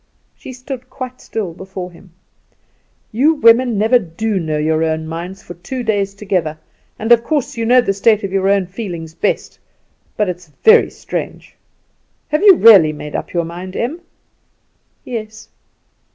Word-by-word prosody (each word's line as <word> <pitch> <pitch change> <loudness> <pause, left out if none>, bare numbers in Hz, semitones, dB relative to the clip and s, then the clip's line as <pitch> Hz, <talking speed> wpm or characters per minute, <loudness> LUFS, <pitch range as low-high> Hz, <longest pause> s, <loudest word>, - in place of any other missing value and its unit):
She - - -10
stood 255 0 -8
quite 255 -1 -8
still 205 -7 -4
before 185 0 -8
him. 175 +1 -18 1.0
"You 285 +9 +3
women 235 -3 +4
never 225 +4 +4
do 200 +2 -3
know 155 -3 -2
your 155 +1 +1
own 160 0 -1
minds 175 +4 -7
for 175 - -9
two 245 +9 -6
days 200 -3 -1
together; 185 -6 -2 0.4
and 225 +2 -3
of 235 -1 +6
course 295 -1 -2
you 230 -1 -2
know 250 +1 +6
the 195 - -1
state 215 +1 +2
of 195 -1 -4
your 195 0 +1
own 200 -1 +2
feelings 175 -5 -7
best; - - -2 0.6
but 210 - +1
it's 180 -1 -6 0.2
very 450 +1 +6
strange. - - -7 0.7
Have 300 +2 0
you 400 -2 +8
really 200 - +7
made 150 0 -8
up - - -4
your 170 -1 -1
mind, 180 +3 -8
Em?" 300 +9 -3 1.0
"Yes." 220 -2 -7
200 Hz, 160 wpm, -17 LUFS, 175-240 Hz, 1.0 s, you